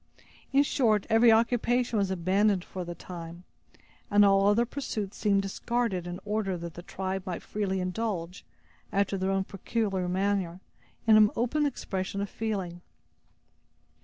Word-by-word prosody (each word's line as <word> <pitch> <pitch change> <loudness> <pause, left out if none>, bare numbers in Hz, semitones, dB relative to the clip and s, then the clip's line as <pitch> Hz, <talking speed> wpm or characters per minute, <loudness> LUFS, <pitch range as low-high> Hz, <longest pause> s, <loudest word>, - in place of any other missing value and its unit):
In 275 +1 +5
short, 220 -8 +2
every 225 +1 +6
occupation 235 0 +2
was 195 -1 +1
abandoned 190 +2 +2
for 185 - -6
the 175 0 -6
time, 170 -1 -9 0.7
and 205 0 +6
all 195 0 +4
other 215 +4 +4
pursuits 225 -6 -4
seemed 200 -1 +2
discarded 195 -2 -2
in 175 +1 -5
order 205 -3 -1
that 170 -1 -7
the 175 - -8
tribe 190 +1 -4
might 180 - -4
freely 195 -2 -2
indulge, 180 -2 -3 0.5
after 200 0 +1
their 190 0 -1
own 195 0 +1
peculiar 195 -1 -2
manner, 190 -2 0 0.5
in 220 -1 +7
an 215 -1 +7
open 290 +6 +1
expression 195 -7 -4
of 200 0 -3
feeling. 190 -6 -3
195 Hz, 145 wpm, -28 LUFS, 185-220 Hz, 0.7 s, in